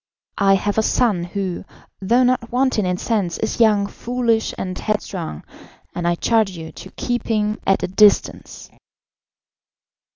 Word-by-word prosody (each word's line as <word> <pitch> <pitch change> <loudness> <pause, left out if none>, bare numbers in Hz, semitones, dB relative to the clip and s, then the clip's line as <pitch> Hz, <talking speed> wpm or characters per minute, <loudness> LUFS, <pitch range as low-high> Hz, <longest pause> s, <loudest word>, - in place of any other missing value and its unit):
I 195 -1 +5
have 205 +2 0
a - - +4
son, 210 -5 +1
who, 185 -1 -4 0.4
though 235 +6 +3
not 250 -2 0
wanting 250 -5 +1
in 180 0 -1
sense, 195 -6 -1
is 220 - -3
young, 210 -3 +4
foolish, 230 +1 -1
and 185 -1 -4
headstrong, 185 - -4 0.5
and 175 -1 -2
I 175 - +2
charge 220 +2 +2
you 165 -3 -8
to - - -11
keep 240 -1 -3
him 210 -1 0
at 195 - +2
a - - 0
distance." 205 +2 +2
210 Hz, 150 wpm, -20 LUFS, 185-230 Hz, 0.5 s, I